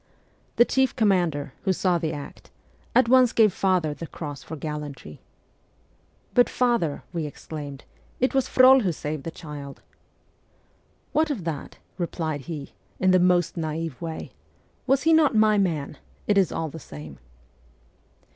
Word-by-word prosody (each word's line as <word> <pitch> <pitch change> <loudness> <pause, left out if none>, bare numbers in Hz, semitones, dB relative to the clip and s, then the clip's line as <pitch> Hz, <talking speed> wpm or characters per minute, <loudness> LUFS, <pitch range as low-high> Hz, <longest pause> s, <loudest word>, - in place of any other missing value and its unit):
The 240 - +6
chief 265 +1 +1
com 220 -4 +3
mander, 165 -7 0
who 190 - +1
saw 180 -1 +1
the 160 -1 -2
act, 145 -3 -9 0.5
at 255 - +5
once 255 -1 +5
gave 215 -4 +4
father 180 -6 +1
the 165 +2 -8
cross 145 -3 -7
for 160 - -8
gallantry. 145 - -7 0.6
' - - -38
But, 245 - +5
father,' 235 - 0
we 165 -3 -2
exclaimed, 145 -2 -8 0.2
' - - -33
it 255 - +1
was 270 -1 +2
Frol 260 +1 +7
who 190 -8 0
saved 150 -1 -5
the - - -2
child! 150 -4 -9 0.5
' - - -39
' - - -39
What 310 0 +2
of 250 - -3
that? 160 -4 -5
' - - -39
replied 160 -4 -2
he, 150 -4 -6 0.3
in 185 0 +3
the 185 - +5
most 180 -2 +2
na'ive 160 -2 -4
way. 165 -1 -5 0.3
' - - -38
Was 270 +1 +3
he 325 +1 +4
not 310 -6 +4
my 215 -1 +4
man? 155 -7 -1 0.3
It 205 - +2
is 195 -2 +3
all 160 -1 -3
the 160 - -9
same.' 75 - -10
170 Hz, 175 wpm, -25 LUFS, 150-220 Hz, 0.6 s, Frol